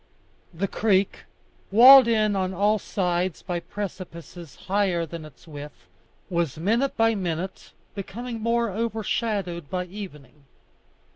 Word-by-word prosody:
The 185 +4 -2
creek, 200 -1 +1 0.4
walled 255 +4 +9
in 215 -3 +2
on 190 -1 -1
all 210 +3 +2
sides 180 -3 -2
by 175 -2 -2
precipices 170 -4 -8
higher 190 -3 0
than 165 -1 -8
its 155 +3 -16
width, 145 - -10 0.4
was 170 -5 -1
minute 230 - 0
by 225 0 +4
minute 185 -2 -4 0.2
becoming 225 +4 -6
more 230 0 +1
overshadowed 210 -6 -2
by 180 -1 -2
evening. 150 - -10
190 Hz, 120 wpm, -25 LUFS, 170-215 Hz, 0.4 s, walled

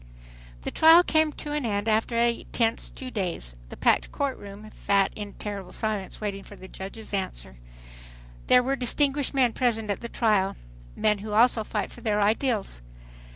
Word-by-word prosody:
The - - -3
trial 325 +2 +7
came 315 -2 +2
to 295 - -6
an 295 -1 -1
end 205 -2 -1
after 225 +2 +1
a 235 0 +1
tense 230 -1 0
two 255 -1 -7
days. 175 - -3
The - - -9
packed - - +2
court 280 -2 -1
room 205 +2 -10
fat 200 -1 +1
in 210 -1 -5
a - - -15
terrible 200 -3 -6
silence 210 -4 -3
awaiting 200 -2 -4
the 195 -2 -12
judge's 200 +4 -8
answer. 65 - -4 0.9
There 250 0 +6
were 270 +2 0
distinguished 275 +2 0
men 250 -4 +3
present 225 -4 0
at 200 - -3
the 235 - -6
trial—men 195 - -1
who 210 +1 -6
also 225 0 +4
fight 210 -1 -3
for - - -12
their 210 -2 0
ideals. 210 - 0
215 Hz, 170 wpm, -26 LUFS, 200-250 Hz, 0.9 s, trial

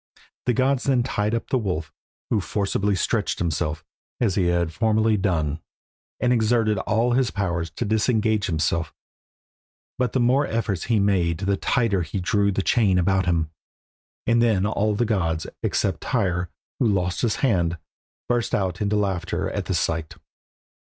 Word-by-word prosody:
The 125 - +4
gods 130 +2 +1
then 130 -3 +3
tied 105 -3 -1
up 115 - -4
the 130 - +3
wolf, 90 -8 -3 0.4
who 110 - +2
forcibly 100 +1 0
stretched 95 - 0
himself, 80 -1 -2 0.3
as 115 -6 +2
he 90 -1 +1
had 85 -2 0
formerly 110 +1 +2
done, 80 -6 0 0.6
and 125 0 +2
exerted 110 -3 +2
all 115 +5 +1
his 125 -1 +2
powers 85 -5 -2
to 80 - -4
disengage 110 0 +1
himself; 80 0 -1 1.0
but 125 -3 0
the 130 - +2
more 130 +4 +3
efforts 110 -5 -2
he 115 -3 +2
made 90 -4 +1
the 100 0 +1
tighter 105 -2 +1
he 90 +3 -3
drew 100 +2 +1
the 95 0 -1
chain 100 -5 +3
about 95 +1 +2
him, 80 -3 +1 0.7
and 115 +1 +3
then 110 -5 +3
all 105 0 0
the 120 +3 +1
gods, 85 -7 0 0.2
except - - 0
Tyr, 90 -7 0 0.3
who 120 - +3
lost 90 -4 0
his 115 -4 +1
hand, 90 -8 +1 0.5
burst 120 -1 0
out 95 -1 -2
into 105 0 +1
laughter 95 -3 -1
at - - -3
the - - -1
sight. 80 -1 -1
100 Hz, 160 wpm, -24 LUFS, 90-115 Hz, 1.0 s, The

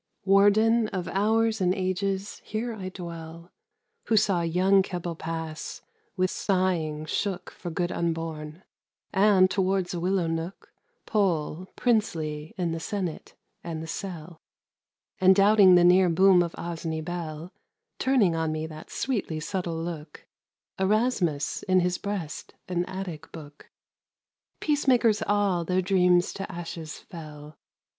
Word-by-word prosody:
Warden 215 +4 +4
of 185 -4 -4
hours 220 +2 +1
and 180 0 +2
ages, 195 +1 -2
here 230 +2 -3
I 190 -4 -6
dwell, 170 -1 -9 0.5
Who 220 - +2
saw 195 -4 +3
young 185 +4 +3
Keble 175 -2 -4
pass, 160 -1 -6 0.3
with 185 0 +1
sighing 175 -6 0
shook 195 +4 -3
For 175 - -7
good 175 +1 -2
unborn; 165 0 -3 0.5
and, 195 -1 +5
towards 190 -1 0
a 175 - -3
willow 185 0 +1
nook, 165 +3 -5 0.3
Pole, 180 -4 0
princely 160 -10 -1
in 175 -3 -1
the 165 - -3
senate 180 -1 -4 0.3
and 160 -2 -5
the - - -5
cell; 170 -1 -7 0.8
And 190 0 +6
doubting 200 -2 +7
the 175 - +6
near 180 +1 +6
boom 185 +2 +5
of 170 -1 -2
Osney 165 -2 -4
bell, 165 0 -6 0.5
Turning 245 -10 +3
on 160 -1 0
me 155 0 -3
that 155 -1 -10
sweetly 205 -11 -2
subtile 175 0 -3
look, 160 -3 -7 0.5
Erasmus, 190 - +1
in 185 -1 +3
his 180 0 0
breast 185 -7 -5
an 180 -1 -1
Attic 185 -5 -7
book: 150 -3 -12 0.9
Peacemakers 250 -7 +3
all, 200 -4 +2
their 185 +2 0
dreams 180 -2 +3
to 195 - -6
ashes 165 -2 -6
fell. 150 -3 -11
180 Hz, 130 wpm, -27 LUFS, 165-195 Hz, 0.9 s, doubting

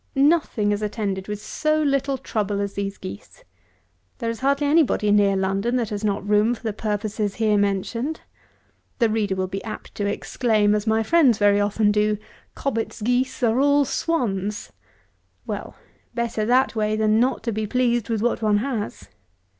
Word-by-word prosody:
Nothing 275 -7 +2
is 205 0 -1
attended 205 -3 -3
with 210 -1 -4
so 305 +8 0
little 275 -2 +1
trouble 210 -5 -2
as 200 0 -2
these 200 0 -4
geese. 100 +2 -10 0.7
There 230 - -2
is 230 - -7
hardly 280 +2 +1
any 310 +4 +5
body 210 -7 +1
near 200 -1 +4
London 195 +5 0
that 235 -4 -1
has 205 0 -4
not 205 -1 -1
room 210 +3 +3
for 230 - -17
the 220 -2 -2
purposes 210 -1 -2
here 215 -2 +2
mentioned. 205 +9 -1 0.8
The 230 -3 +3
reader 210 -3 0
will 185 0 -1
be 195 +3 -5
apt 225 - -8
to 205 - -2
exclaim, 210 0 +1
as 210 +1 -1
my 220 0 +2
friends 270 -3 +4
very 205 -1 +4
often 205 +1 +2
do, 210 0 +1 0.4
"Cobbett's 230 -5 -3
Geese 250 +2 0
are 230 +1 +3
all 285 +1 +4
Swans." 210 - -2 0.7
Well, - - -5 0.4
better 235 -2 -1
that 255 0 +3
way 215 -1 0
than 215 0 +2
not 255 +3 +1
to 230 - -1
be 215 0 -2
pleased 240 -2 +1
with 225 -2 -1
what 240 -1 0
one 210 -2 +3
has. 225 -2 -4
215 Hz, 175 wpm, -23 LUFS, 205-245 Hz, 0.8 s, any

